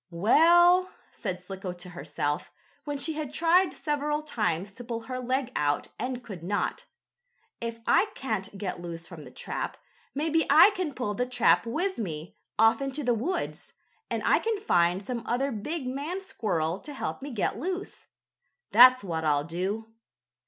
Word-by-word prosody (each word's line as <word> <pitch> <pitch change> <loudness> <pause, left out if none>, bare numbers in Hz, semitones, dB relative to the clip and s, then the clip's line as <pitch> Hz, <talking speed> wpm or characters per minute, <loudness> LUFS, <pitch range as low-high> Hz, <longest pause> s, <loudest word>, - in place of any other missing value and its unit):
"Well," 345 - +5 0.2
said 180 0 -5
Slicko 190 -1 -6
to 180 +1 -11
herself, 150 -2 -3 0.3
when 290 -1 -3
she 315 +3 -2
had 300 -3 -4
tried 340 +4 +3
several 295 0 -1
times 195 - -1
to 245 - -10
pull 230 -1 -4
her 255 +2 -5
leg 255 +1 -1
out 145 0 0
and 250 +1 -3
could 195 -8 -8
not, 200 +5 -2 0.7
"if 230 0 -4
I 430 - +4
can't 215 -6 -3
get 185 -3 -4
loose 170 -1 -7
from 170 -2 -10
the - - -10
trap, - - -5 0.4
maybe 320 +2 +1
I 315 +9 +8
can 365 -8 -3
pull 210 -5 -2
the 245 +5 -1
trap 245 -2 +3
with 365 +11 -1
me, 165 -6 -5 0.2
off 225 +3 +5
into 275 +2 -2
the 245 - +2
woods, 260 - -3 0.4
and - - -2
I - - +5
can 445 -2 -1
find 180 - +2
some 240 0 -3
other 270 +4 0
big 270 +7 -4
man 285 +8 -3
squirrel 175 - -1
to 295 - -9
help 265 - -4
me 280 - -6
get 230 -7 -1
loose. 375 +3 -5 0.6
That's 255 +2 +8
what 165 -4 -3
I'll 145 -2 +2
do." 195 +7 -4
240 Hz, 165 wpm, -28 LUFS, 185-295 Hz, 0.7 s, I